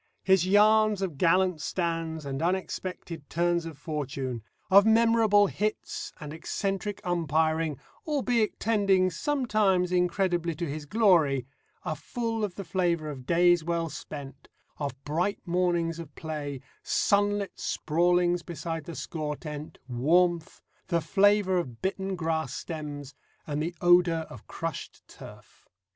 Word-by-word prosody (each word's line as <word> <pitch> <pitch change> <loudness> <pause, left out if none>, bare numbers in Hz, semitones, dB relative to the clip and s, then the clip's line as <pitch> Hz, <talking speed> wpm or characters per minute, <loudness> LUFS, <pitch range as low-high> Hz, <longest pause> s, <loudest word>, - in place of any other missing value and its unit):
His 190 -2 +4
yarns 210 0 +4
of 165 -8 -4
gallant 180 -1 +3
stands 165 -2 -2
and 135 +1 -4
unexpected 180 -3 -3
turns 170 0 0
of 160 -4 -9
fortune, 140 -5 -4 0.3
of 200 +1 +8
memorable 220 -2 +5
hits 210 +2 -3
and 150 -2 -7
eccentric 195 +4 -3
umpiring, 160 -3 0 0.3
albeit 245 -7 0
tending 195 -4 +2
sometimes 210 - +1
incredibly 180 -2 +1
to 170 +1 -3
his 145 +1 -6
glory, 165 - +3 0.4
are 155 - -1
full 225 - -3
of 200 -4 -2
the 200 - -5
flavour 170 -5 0
of 130 -2 -10
days 175 0 +4
well 165 0 -1
spent, 140 -2 -9 0.3
of 140 -3 -3
bright 170 +7 -1
mornings 175 -2 0
of 155 -4 -9
play, 145 -4 -5 0.2
sunlit 205 0 +1
sprawlings 175 +2 +1
beside 165 -1 -5
the 170 - -7
score 150 -2 -4
tent, 150 0 -8
warmth, 165 +7 +1 0.3
the 170 -2 +1
flavour 195 +2 +3
of 125 -9 -6
bitten 190 0 -2
grass 160 -5 -2
stems, 145 -5 -6 0.3
and 150 0 -2
the 170 +3 -3
odour 175 -2 +4
of - - -12
crushed 165 -3 -6
turf. - - -14
170 Hz, 130 wpm, -28 LUFS, 155-195 Hz, 0.4 s, of